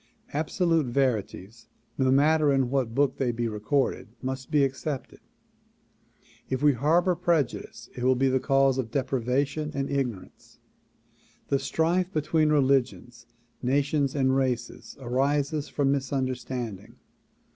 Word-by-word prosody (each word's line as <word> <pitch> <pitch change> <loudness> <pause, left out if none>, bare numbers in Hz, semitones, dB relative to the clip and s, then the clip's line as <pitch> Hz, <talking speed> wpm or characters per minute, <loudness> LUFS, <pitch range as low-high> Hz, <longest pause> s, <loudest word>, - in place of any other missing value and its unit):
Absolute 160 0 +1
verities 115 -4 -2 0.3
no 130 -1 +1
matter 150 +2 +4
in 135 -2 +1
what 125 -4 -1
book 140 -1 +2
they 125 -3 0
be 120 0 -2
recorded 110 +6 -1
must 130 0 -5
be 150 -3 +3
ac 135 -1 +1
cepted. 140 -1 -6 1.3
If 130 +1 -2
we 145 -1 +5
harbor 165 +8 +2
prejudice 170 -6 -1
it 125 - -5
will 130 +1 +4
be 135 +2 +2
the 130 0 +2
cause 135 -1 +2
of 120 -4 -2
deprivation 135 +3 -1
and 140 0 -2
ignorance. 125 -8 -4 0.9
The 140 - +2
strife 170 +6 0
between 155 0 +1
religions, 130 -4 0 0.3
nations 140 +2 +1
and 130 -1 +2
races 125 -3 -2
arises 140 +4 0
from 140 -2 +1
misunderstanding. 130 -5 -3
135 Hz, 125 wpm, -26 LUFS, 125-145 Hz, 1.3 s, we